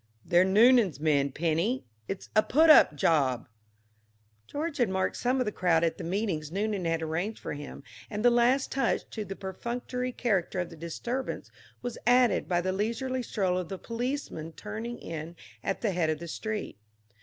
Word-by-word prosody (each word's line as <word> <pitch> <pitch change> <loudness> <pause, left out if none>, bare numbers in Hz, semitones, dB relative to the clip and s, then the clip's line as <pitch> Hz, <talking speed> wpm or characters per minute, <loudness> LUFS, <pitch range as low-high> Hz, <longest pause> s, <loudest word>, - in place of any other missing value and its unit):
"They're 175 +1 +5
Noonan's 210 - +5
men, 145 -3 +2
Penny; 170 - 0 0.2
it's 195 - -6
a 215 - +7
put 315 +8 +5
up 150 - +7
job." 135 -5 +2 1.0
George 305 +1 -3
had 240 -5 +2
marked 190 0 0
some 255 +2 0
of 255 - +1
the 210 - -1
crowd 170 -4 +2
at 165 - 0
the - - -5
meetings 170 -5 -2
Noonan 200 -1 -1
had 165 -1 0
arranged 175 +7 -2
for - - -5
him, 145 -1 -8 0.3
and 210 +1 -3
the 245 - +7
last 240 +3 +3
touch 270 - 0
to 220 - -4
the 195 -1 -6
perfunctory 245 +6 -4
character 195 -7 0
of 175 -1 -3
the - - -9
disturbance 235 +11 -4 0.3
was 245 -1 -4
added 245 -3 +4
by 175 -1 +2
the 185 +1 -1
leisurely 235 +6 -1
stroll 190 -6 0
of 180 - -5
the 190 - -4
policeman 230 - -4
turning 220 +6 -6
in 165 +1 -7 0.3
at 195 - -2
the 215 - +1
head 170 -3 +1
of 155 - 0
the 170 +2 -8
street. 215 - -4
195 Hz, 180 wpm, -29 LUFS, 165-240 Hz, 1.0 s, a